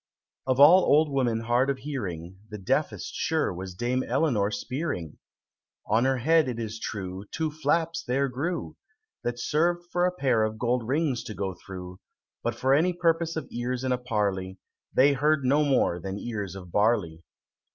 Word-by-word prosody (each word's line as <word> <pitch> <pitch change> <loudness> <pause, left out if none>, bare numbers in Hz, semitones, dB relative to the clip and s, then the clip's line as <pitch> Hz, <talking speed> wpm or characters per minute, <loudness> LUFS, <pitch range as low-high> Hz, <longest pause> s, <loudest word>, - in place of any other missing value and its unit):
_ - - +2
Of 130 - 0
all 165 +7 +9
old 150 +1 +4
women 120 -5 +1
hard 120 +4 +2
of 140 - 0
hearing, 95 - -6
The 105 - -6
deafest, 95 - -1
sure, - - 0
was 90 +1 -7
Dame 125 +5 0
Eleanor 120 -10 +1
Spearing! 110 - -4 0.7
On 110 +4 +2
her 135 0 +2
head, 160 +4 +3
it 120 - -4
is 110 0 -5
true, 95 -2 -5
Two 160 -1 -2
flaps 160 +2 0
there 135 +3 0
grew, 135 - -3 0.5
That 120 0 -2
served 170 +7 0
for 180 0 +2
a - - 0
pair 130 -10 +1
of 110 0 -2
gold 120 0 0
rings 135 -3 0
to 110 - -6
go 95 -2 -3
through, 90 +1 -9 0.4
But 120 -1 -2
for 130 +3 +2
any 170 +6 +3
purpose 165 -1 +1
of 155 -5 -4
ears 125 +1 -3
in 130 - 0
a 125 - +1
parley, 100 -6 -2 0.3
They 140 +2 +5
heard 145 0 +2
no 145 +4 +4
more 130 -11 +2
than 95 +3 -5
ears 105 -5 -5
of 90 -3 -10
barley. 100 -7 +1
125 Hz, 180 wpm, -27 LUFS, 105-145 Hz, 0.7 s, all